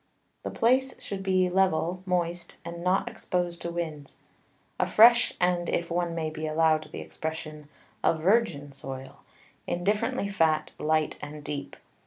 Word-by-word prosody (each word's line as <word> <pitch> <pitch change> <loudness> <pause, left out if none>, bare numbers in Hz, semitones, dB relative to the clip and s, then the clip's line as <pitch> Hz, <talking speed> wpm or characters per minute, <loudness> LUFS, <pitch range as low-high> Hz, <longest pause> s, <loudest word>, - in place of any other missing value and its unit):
The - - -4
Place 260 +3 +2
should 195 -1 -5
be 185 -1 +2
level, 180 -1 +1
moist, 175 -1 -1
and 170 0 -6
not 185 +5 +2
exposed 180 -6 -2
to 170 - -3
Winds; 155 -5 -5 0.6
a - - +2
fresh, 235 +2 +6
and 180 -1 +1
(if 170 0 -1
one 170 -1 0
may 160 -1 -2
be 155 0 -4
allow'd 155 0 +2
the - - -6
Expression) 155 -2 -6 0.3
a 165 - +3
Virgin 160 -5 +1
Soil, 135 -1 -8 0.5
indifferently 205 +6 0
fat, 160 -6 +1
light, 155 0 +1
and 150 0 -8
deep. 145 -1 -5
170 Hz, 145 wpm, -28 LUFS, 155-185 Hz, 0.6 s, fresh